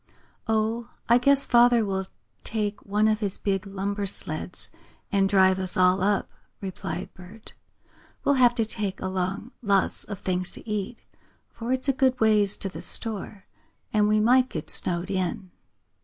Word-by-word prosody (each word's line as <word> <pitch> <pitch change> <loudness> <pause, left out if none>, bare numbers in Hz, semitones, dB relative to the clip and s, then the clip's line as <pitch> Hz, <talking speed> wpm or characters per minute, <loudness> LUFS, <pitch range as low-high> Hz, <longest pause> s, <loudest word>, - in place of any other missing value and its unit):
"Oh, 225 +2 0 0.2
I 235 +1 +5
guess 280 +2 +4
father 240 -1 +5
will 190 -1 -2 0.4
take 210 -2 -2
one 210 +2 +2
of 215 0 +2
his 205 -3 -2
big 195 -1 -2
lumber 200 +1 -3
sleds 160 -1 -4 0.4
and 195 -1 +2
drive 190 -1 +4
us 185 -1 -3
all 185 0 +4
up," 200 +1 +1 0.3
replied 190 -1 -5
Bert. 195 +5 -13 0.7
"We'll 285 - +3
have 240 -1 +5
to 225 -2 +1
take 205 -3 -1
along 190 +5 -3
lots 200 -4 +1
of 205 - -6
things 185 -1 -2
to - - -11
eat, 210 +2 -4 0.5
for 235 +2 -5
it's 260 +1 +1
a 275 - +3
good 260 -1 +2
ways 210 -2 +3
to - - -1
the 190 - -8
store, 210 -2 -4 0.5
and 210 -1 +3
we 215 0 +3
might 250 +4 +4
get 155 - -5
snowed 180 +2 0
in." 185 0 -2
205 Hz, 160 wpm, -26 LUFS, 190-225 Hz, 0.7 s, I